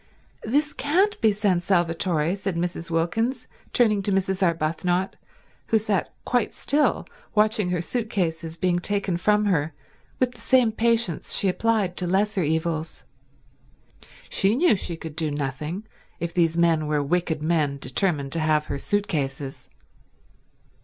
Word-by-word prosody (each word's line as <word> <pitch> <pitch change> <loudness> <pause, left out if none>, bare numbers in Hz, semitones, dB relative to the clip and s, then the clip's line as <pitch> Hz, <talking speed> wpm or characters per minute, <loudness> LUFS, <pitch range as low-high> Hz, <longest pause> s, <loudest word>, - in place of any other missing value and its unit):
"This 290 +6 0
can't 370 +9 +1
be 220 - +5
San 200 -4 +1
Salvatore," 170 -2 +1
said 195 -2 -3
Mrs. 170 -1 -3
Wilkins, 225 +10 -1 0.3
turning 215 -4 +3
to 200 - -1
Mrs. 190 0 0
Arbuthnot, 175 +2 0 0.5
who 225 - +3
sat 210 -4 -1
quite 245 -3 0
still 295 +2 +2 0.3
watching 215 -2 +2
her 175 -1 -1
suit 230 +3 -3
cases 165 -4 -2
being 175 0 +1
taken 200 -1 0
from 210 +4 +2
her 160 -6 0 0.4
with 255 -1 +2
the 245 - -14
same 255 -4 +3
patience 230 -6 +1
she 200 - +1
applied 205 -1 0
to 180 - 0
lesser 200 +2 +1
evils. 160 0 -2 1.2
She 195 +3 +3
knew 300 -4 +4
she 175 -3 -1
could 160 -2 -8
do 160 -1 0
nothing 150 +6 -4 0.4
if 170 0 -4
these 165 -2 +2
men 165 -3 +2
were 150 -1 0
wicked 160 0 -1
men 155 -4 +1
determined 145 -3 0
to 165 - +1
have 155 -1 +1
her 140 - -4
suit 205 +5 -1
cases. 135 -2 -4
180 Hz, 145 wpm, -24 LUFS, 160-210 Hz, 1.2 s, be